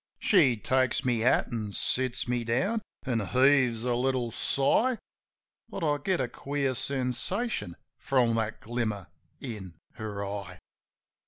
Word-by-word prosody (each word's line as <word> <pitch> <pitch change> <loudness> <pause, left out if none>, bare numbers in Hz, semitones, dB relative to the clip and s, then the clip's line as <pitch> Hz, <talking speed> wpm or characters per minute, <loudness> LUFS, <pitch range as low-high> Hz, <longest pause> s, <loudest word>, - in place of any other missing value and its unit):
She 145 - +4
takes 130 +3 +1
my 125 -2 +2
hat 115 +3 +2
an' 110 -3 -3
sits 130 +3 0
me 120 -1 0
down 190 - 0 0.2
an' 125 -4 0
heaves 125 +1 +3
a 125 -1 +1
little 125 -1 0
sigh. 220 - +2 0.7
But 190 - -5
I 145 -2 +1
get 185 +5 0
a - - 0
queer 140 -1 -2
sensation 130 - -2 0.2
from 125 -4 +2
that 110 -1 -2
glimmer 110 -5 -3 0.3
in 100 -9 -7 0.2
her 105 -3 -4
eye. 100 -2 -6
125 Hz, 135 wpm, -28 LUFS, 110-135 Hz, 0.7 s, She